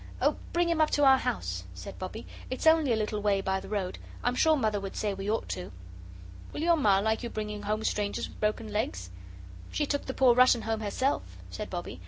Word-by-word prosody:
"Oh, - - +2 0.2
bring 345 0 +2
him 335 -2 +2
up 310 - +4
to 290 - +3
our 265 -1 +7
house," 90 - -2
said 90 - -9
Bobbie. 190 +5 -6 0.2
"It's 255 - -4
only 320 -4 +5
a - - +4
little 215 -1 -2
way 205 -1 +2
by 190 0 0
the - - -10
road. 195 -3 -2 0.2
I'm 245 - +2
sure 315 +5 +4
Mother 215 -7 0
would 195 -1 -6
say 210 -2 -1
we 195 +1 -4
ought 220 - -1
to." 180 - -4 0.8
"Will - - -5
your 340 0 +5
Ma 210 -11 +4
like 220 +3 +1
you 240 - -4
bringing 210 -1 -4
home 215 +1 -2
strangers 205 -2 -1
with - - -15
broken 215 0 -1
legs?" 95 - -2 0.6
"She 295 - 0
took 285 0 -2
the 260 - -4
poor 255 -2 +6
Russian 250 -1 +5
home 225 0 -1
herself," 240 +6 -1
said 210 - -5
Bobbie. 175 - -5
215 Hz, 225 wpm, -29 LUFS, 200-260 Hz, 0.8 s, our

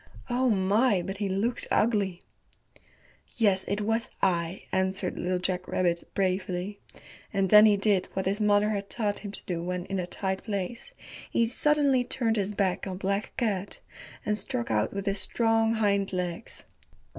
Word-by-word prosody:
Oh 255 +1 +2
my, 200 0 +3
but 195 +2 -5
he 200 -1 -2
looked 215 +6 -1
ugly. 205 -5 +1 1.1
"Yes, 200 -4 +3
it 205 +2 -1
was 225 +3 0
I," 175 -1 0
answered 190 0 -1
Little 180 +1 0
Jack 180 0 -2
Rabbit 175 -2 0
bravely, 185 +1 -1 0.5
and 195 -2 0
then 210 +1 +9
he 205 -1 +4
did 200 -2 +2
what 190 - -2
his 200 +3 0
mother 210 0 +3
had 200 -1 -3
taught 210 -3 -1
him 205 - -7
to - - -11
do 170 -2 -3
when 180 +1 -3
in 195 0 -3
a 175 - -3
tight 190 +1 -3
place. 215 - -4 0.4
He 230 - +2
suddenly 280 0 +2
turned 235 -2 0
his 200 0 0
back 195 -1 0
on 185 -1 -4
Black 200 +2 -2
Cat 205 -5 -1 0.5
and 210 0 +2
struck 120 -11 -2
out 105 0 +1
with 200 0 -4
his 200 -1 -1
strong 225 -1 +2
hind 200 -2 +1
legs. 180 +3 -4
200 Hz, 170 wpm, -28 LUFS, 185-215 Hz, 1.1 s, then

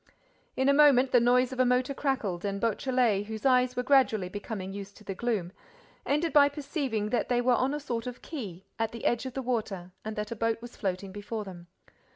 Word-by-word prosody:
In 265 +1 +2
a 280 - +6
moment, 275 -3 +5
the 245 - +6
noise 250 +2 +3
of 260 - -7
a - - +6
motor 250 +2 +2
crackled 240 -11 -2
and 200 -1 -2
Beautrelet, 230 -2 +1
whose 220 +1 -6
eyes 255 -1 +4
were 250 - -1
gradually 250 -8 +3
becoming 200 -1 -6
used 200 0 -8
to - - -15
the 195 - -4
gloom, 200 -5 -2 0.6
ended 310 +3 +1
by 285 -1 +7
perceiving 275 -7 -3
that 245 - 0
they 245 -1 +2
were 245 +1 +3
on 255 +2 +2
a 295 - -2
sort 240 -5 -4
of 250 -1 -7
quay, 200 - -7
at 225 0 -1
the 230 - -7
edge 240 +2 +1
of 255 - -8
the 265 - -3
water, 210 -7 -3
and 220 0 -5
that 210 0 -4
a - - -2
boat 230 +1 0
was 240 +1 -10
floating 190 -1 -3
before 210 +2 -5
them. 175 -3 -10
235 Hz, 220 wpm, -29 LUFS, 205-255 Hz, 0.6 s, by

